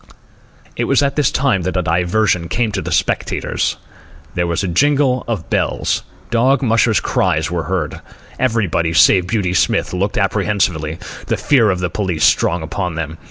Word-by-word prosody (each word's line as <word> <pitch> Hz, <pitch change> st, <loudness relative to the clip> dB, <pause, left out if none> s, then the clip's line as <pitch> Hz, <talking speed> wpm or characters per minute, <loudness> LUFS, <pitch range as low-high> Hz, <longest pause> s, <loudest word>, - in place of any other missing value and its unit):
It -, -, -1 dB
was -, -, +2 dB
at 140 Hz, -, 0 dB
this 150 Hz, -3 st, +2 dB
time 135 Hz, -8 st, +1 dB
that 90 Hz, +1 st, -2 dB
a 90 Hz, -, 0 dB
diversion 90 Hz, 0 st, +1 dB
came 115 Hz, -2 st, 0 dB
to 95 Hz, -2 st, -2 dB
the -, -, -5 dB
spectators. -, -, -1 dB, 0.6 s
There 90 Hz, 0 st, -1 dB
was 85 Hz, +2 st, -1 dB
a -, -, -1 dB
jingle 135 Hz, -, +2 dB
of 105 Hz, -9 st, -4 dB
bells. -, -, 0 dB, 0.3 s
Dog 125 Hz, +3 st, +2 dB
mushers' 115 Hz, -3 st, +3 dB
cries 80 Hz, +1 st, 0 dB
were 85 Hz, -2 st, -2 dB
heard. 90 Hz, -6 st, -2 dB, 0.4 s
Everybody, 105 Hz, -10 st, 0 dB
save 90 Hz, +3 st, +5 dB
Beauty 95 Hz, -3 st, -1 dB
Smith, 90 Hz, -, +1 dB
looked 95 Hz, +3 st, -1 dB
apprehensively, 95 Hz, -5 st, 0 dB, 0.3 s
the -, -, 0 dB
fear 120 Hz, -7 st, +3 dB
of 95 Hz, -, +1 dB
the 90 Hz, -, -1 dB
police 90 Hz, -5 st, -2 dB
strong 85 Hz, -1 st, +2 dB
upon 90 Hz, +1 st, -3 dB
them. 80 Hz, 0 st, -5 dB
95 Hz, 165 wpm, -17 LUFS, 85-115 Hz, 0.6 s, save